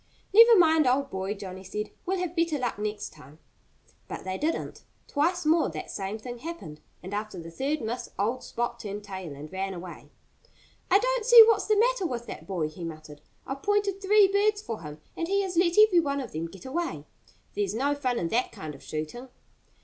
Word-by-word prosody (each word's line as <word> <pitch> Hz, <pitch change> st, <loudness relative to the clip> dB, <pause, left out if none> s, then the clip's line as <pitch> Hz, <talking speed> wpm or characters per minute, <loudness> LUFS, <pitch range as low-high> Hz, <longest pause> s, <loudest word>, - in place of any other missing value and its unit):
"Never 460 Hz, +1 st, +9 dB
mind, 320 Hz, -4 st, +5 dB
old 275 Hz, +2 st, +1 dB
boy!" 190 Hz, +2 st, -3 dB
Johnnie 190 Hz, -2 st, -8 dB
said. 210 Hz, +3 st, -5 dB, 0.2 s
"We'll 380 Hz, +1 st, +1 dB
have 360 Hz, -2 st, -3 dB
better 335 Hz, -3 st, +1 dB
luck 245 Hz, -5 st, -2 dB
next 210 Hz, 0 st, -4 dB
time!" 150 Hz, -1 st, -15 dB, 0.7 s
But -, -, -6 dB
they 185 Hz, 0 st, -3 dB
didn't. 310 Hz, +11 st, -2 dB, 0.3 s
Twice 340 Hz, +4 st, 0 dB
more 320 Hz, -, +3 dB
that 155 Hz, -2 st, -6 dB
same 195 Hz, +2 st, -4 dB
thing 240 Hz, +2 st, -8 dB
happened. 300 Hz, -, -8 dB, 0.2 s
And 190 Hz, +3 st, -7 dB
after 215 Hz, +1 st, -4 dB
the 165 Hz, 0 st, -9 dB
third 280 Hz, -, -2 dB
miss 235 Hz, +2 st, -4 dB
old 230 Hz, +6 st, 0 dB
Sport 240 Hz, 0 st, -3 dB
turned 205 Hz, 0 st, -6 dB
tail 190 Hz, -7 st, -7 dB
and 150 Hz, +2 st, -10 dB
ran 190 Hz, 0 st, -3 dB
away. 175 Hz, 0 st, -9 dB, 0.8 s
"I 380 Hz, -, +7 dB
don't -, -, 0 dB
see 475 Hz, 0 st, +10 dB
what's 455 Hz, -, +2 dB
the 430 Hz, -, +3 dB
matter 470 Hz, -4 st, +2 dB
with 240 Hz, -4 st, -4 dB
that -, -, -9 dB
boy," 175 Hz, -6 st, -1 dB
he 155 Hz, +3 st, -9 dB
muttered. 155 Hz, -2 st, -8 dB, 0.2 s
"I've 270 Hz, +1 st, -5 dB
pointed 405 Hz, -1 st, 0 dB
three 410 Hz, +1 st, +6 dB
birds 410 Hz, +2 st, +2 dB
for 230 Hz, -, -6 dB
him. 150 Hz, -1 st, -9 dB, 0.2 s
And 330 Hz, -, -2 dB
he 395 Hz, +2 st, +1 dB
has 370 Hz, -2 st, -4 dB
let 340 Hz, +1 st, +2 dB
every 425 Hz, -5 st, +7 dB
one 280 Hz, -3 st, 0 dB
of 255 Hz, -4 st, -6 dB
them 160 Hz, +2 st, -3 dB
get 180 Hz, +2 st, -13 dB
away.... 260 Hz, -, -3 dB, 0.5 s
There's 205 Hz, 0 st, -1 dB
no 280 Hz, +5 st, +1 dB
fun 260 Hz, -4 st, -1 dB
in 170 Hz, -, -1 dB
that 240 Hz, +6 st, 0 dB
kind 155 Hz, -1 st, -7 dB
of 140 Hz, -, -13 dB
shooting." 155 Hz, +12 st, -6 dB
250 Hz, 205 wpm, -27 LUFS, -, 0.8 s, see